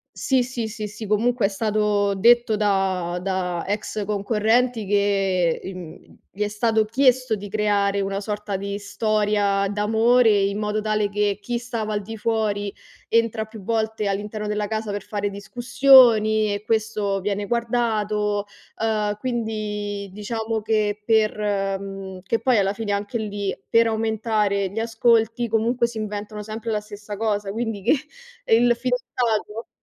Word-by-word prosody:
Sì, 260 -2 +2
sì, 240 -2 -4
sì, 215 -1 -5
sì, 215 +1 -8
comunque 225 +1 +2
è - - -1
stato 210 -1 +1
detto 235 +2 +4
da 190 -4 0
da 180 -2 -2
ex 205 +1 -3
concorrenti 220 +3 +1
che, 195 -4 +1
ehm, 180 -4 -10
gli 210 - -5
è 210 - +1
stato 220 +1 +1
chiesto 255 0 +2
di 205 0 -6
creare 200 -1 +1
una 195 0 -2
sorta 205 -1 -3
di 200 +1 -4
storia 205 -1 +1
d'amore 225 +4 +3
in 200 -1 +2
modo 210 0 -1
tale 215 -1 0
che, 205 0 0
chi 240 +4 -3
stava 230 -3 -3
al 205 - -1
di 225 +2 -8
fuori 210 -2 -1 0.4
entra 230 -1 +1
più 220 -1 -11
volte 220 0 -1
all'interno 210 +2 -3
della 210 0 -1
casa 220 0 -3
per 205 -1 -3
fare 205 -1 -3
discussioni 230 -1 +4
e 205 - -3
questo 215 -3 -1
viene 205 0 -2
guardato, 215 -3 0 0.4
uhm, 210 -2 0
quindi 210 -4 -3
diciamo 220 +2 -3
che 210 -1 0
per 220 -2 +2 0.4
mhmm, 195 -1 -7
che 225 +4 0
poi 250 -4 +2
alla 195 0 +1
fine 205 -1 -3
anche 205 +3 -2
lì, 205 -2 -3
per 230 0 +4
aumentare 220 -3 0
gli 205 - -5
ascolti 230 +1 +2
comunque 230 +2 +1
si 235 - -10
inventano 210 0 -5
sempre 220 +2 -5
la 210 -1 0
stessa 210 0 -9
cosa. 205 -2 -1
Quindi 225 -1 -3
che, - - +3 0.5
ehm, 225 +1 +4
il 240 - +3
fidanzato, 235 -3 -2
210 Hz, 150 wpm, -23 LUFS, 205-225 Hz, 0.5 s, detto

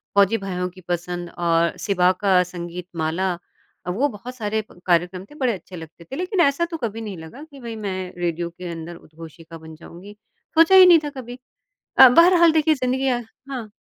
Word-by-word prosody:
फौजी 200 +3 +4
भाइयों 180 -3 -4
की 185 +1 -16
पसंद 175 0 -4
और 170 -1 +1
शिवा 185 -3 +2
का 190 -3 +4
संगीत 175 0 -8
माला, 170 +4 -1 0.5
वो 225 +11 +1
बहुत 245 +2 -9
सारे 220 -2 -2
प - - -18
कार्यक्रम 180 +1 +1
थे, 295 - -17
बड़े 255 -5 0
अच्छे 185 -1 -10
लगते 165 0 -11
थे। 260 - -9
लेकिन 365 +4 -3
ऐसा 280 +2 +2
तो 330 - -3
कभी 225 -5 -4
नहीं 210 -4 -6
लगा 160 - -11
कि 295 -3 -14
भई, 235 -3 -7
मैं 190 -4 -5
रेडियो 170 -1 -2
के 175 +1 -9
अंदर 165 +1 -8
उद्घोषिका 165 0 -13
बन 160 0 -12
जाऊँगी। 175 +5 -13 0.4
सोचा 330 +4 +6
ही 375 -1 +10
नहीं 345 -2 +7
था 295 - -3
कभी 255 -3 -9 0.6
अ, 265 - +11
बहरहाल 340 +4 +6
देखिए, 315 0 +3
ज़िंदगियाँ 255 -1 -1 0.3
हाँ। 240 -6 -6
195 Hz, 190 wpm, -22 LUFS, 175-260 Hz, 0.6 s, अ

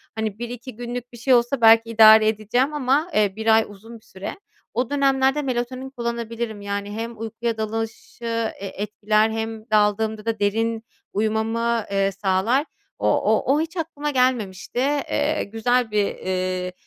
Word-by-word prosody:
Hani, 220 -2 -3
1-2 240 0 -7
günlük 245 +1 -6
bir 240 - -10
şey 255 +3 +2
olsa 240 +1 +2
belki 225 0 +6
idare 220 -1 +7
edeceğim 225 +7 0
ama, 290 +4 +1
eee, 205 -5 +2
1 220 0 +3
ay 225 - +4
uzun 215 +3 -12
bir - - -28
süre. 195 - -8 0.3
O 250 0 -1
dönemlerde 275 0 +2
melatonin 255 0 -3
kullanabilirim. 235 -3 -4
Yani 200 0 -4
hem 225 +1 -5
uykuya 225 +1 -3
dalışı 225 +2 -5 0.3
e 200 - -5
etkiler 210 +2 0
hem 225 0 -5
daldığımda 215 +1 +1
da 225 -1 -1
derin 225 +2 0 0.3
uyumamı, 225 +2 0
eee, 195 0 +1
sağlar. 195 - +1 0.3
O - - 0
o 270 - +2
o 305 - +2
hiç 330 +3 -5
aklıma 300 -3 -3
gelmemişti. 245 -5 0
Eee, 285 +2 0
güzel 225 +2 0
bir, 210 -1 +2
eee, 185 -1 -3
225 Hz, 155 wpm, -23 LUFS, 215-245 Hz, 0.3 s, idare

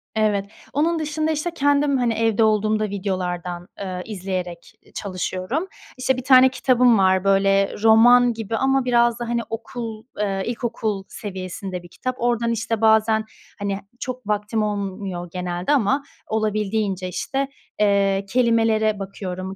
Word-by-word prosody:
Evet. 210 -2 +1 0.3
Onun 325 +4 +1
dışında, 310 +1 -1
işte, 315 +3 -2
kendim, 285 -1 +2
hani, 240 -2 +1
evde 225 0 +2
olduğumda 215 0 +2
videolardan, 180 -3 -3
ııı, 185 -2 -4
izleyerek 185 -4 -5 0.2
çalışıyorum. 190 - -3 0.3
İşte, 255 0 +1
bir 255 - -4
tane 260 0 +7
kitabım 250 -2 +3
var, 190 -1 +3
böyle, 195 0 +3
roman 240 +2 +6
gibi 225 0 -4
ama 270 -1 +2
biraz 240 -1 +3
da, 235 -1 -4
hani, 235 0 0
okul, 225 -1 -6 0.2
ııı 195 -2 -1
ilkokul 225 -4 -3
seviyesinde 185 -2 -6
bir 175 - -12
kitap. 255 +7 -4
Oradan, 235 -1 +1
işte, 225 0 -2
bazen, 220 0 +4 0.3
hani, 200 -1 -2 0.2
çok 255 -3 -6
vaktim 210 +1 0
olmuyor 195 -4 -4
genelde 180 +4 -2
ama 270 +1 +2 0.2
olabildiğince, 210 -3 -1
işte, 270 +9 -2 0.3
eee, 200 -1 +2
kelimelere 225 -3 +2
bakıyorum. 190 -1 -6
215 Hz, 135 wpm, -22 LUFS, 195-240 Hz, 0.3 s, tane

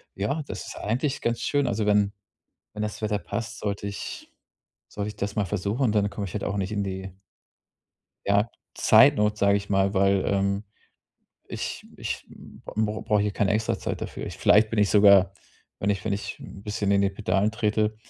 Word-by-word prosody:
Ja, 110 +11 -1
das 105 - -6
ist - - -8
eigentlich 130 +6 -1
ganz 120 0 0
schön. 145 -2 +1
Also, 110 -3 0
wenn 105 -1 +3 0.6
wenn 105 - -4
das 105 -1 -4
Wetter 105 -1 0
passt, 105 +5 -5
sollte 100 -1 -3
ich 100 - -7 0.6
sollte 105 0 -4
ich 105 - -8
das 100 +1 -4
mal 105 - +2
versuchen, 105 +8 0
dann 105 -1 +2
komme 100 -1 -4
ich 90 - -9
halt 105 - -2
auch 100 - -2
nicht 95 +1 -2
in 100 -1 -1
die 95 0 -5 1.1
ja, 100 +3 +2 0.2
Zeitnot, 105 0 +5
sage 100 0 +4
ich 100 0 -4
mal, 95 0 +2
weil, 95 0 +3
ähm, 100 +1 0 0.9
ich - - -5
ich - - -4
b - - -15 0.4
b 110 0 0
brauche 105 -2 +1
hier 105 - 0
keine 100 0 +1
Extrazeit 110 +1 -1
dafür. - - -5
Ich - - -6
vielleicht 110 +1 +5
bin 115 - -2
ich 105 -1 +3
sogar, 100 -2 +6 0.5
wenn 100 - -1
ich 100 -1 -2
wenn - - -1
ich 100 - -4
'n 100 - -11
bisschen 105 -1 -2
in 100 0 +4
den 100 0 +1
Pedalen 100 +1 +1
trete, 110 -1 0
105 Hz, 190 wpm, -26 LUFS, 100-105 Hz, 1.1 s, sogar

